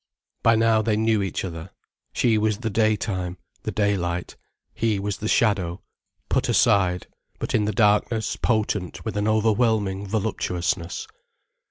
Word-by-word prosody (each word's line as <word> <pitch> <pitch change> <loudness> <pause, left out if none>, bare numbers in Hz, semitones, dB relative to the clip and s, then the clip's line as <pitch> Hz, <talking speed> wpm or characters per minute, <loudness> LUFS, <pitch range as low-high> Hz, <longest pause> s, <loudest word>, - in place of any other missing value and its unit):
By 115 0 +5
now 110 0 +3
they 110 -1 +1
knew 110 -1 +2
each 95 0 -2
other; 80 -3 -7 0.4
she 115 -3 +2
was 110 -1 +1
the 115 -1 -3
daytime, 100 -4 0 0.2
the - - -3
daylight, 90 -4 -1 0.4
he 110 -2 0
was 100 -2 -3
the 110 - -4
shadow, 95 -7 +1 0.4
put - - 0
aside, 90 -3 +3 0.3
but - - -4
in 105 - +2
the 105 - 0
darkness 105 +1 +2
potent 105 -5 -1
with 110 -3 -3
an 105 +1 0
overwhelming 110 -2 +1
voluptuousness. 90 -4 -2
105 Hz, 140 wpm, -24 LUFS, 95-110 Hz, 0.4 s, By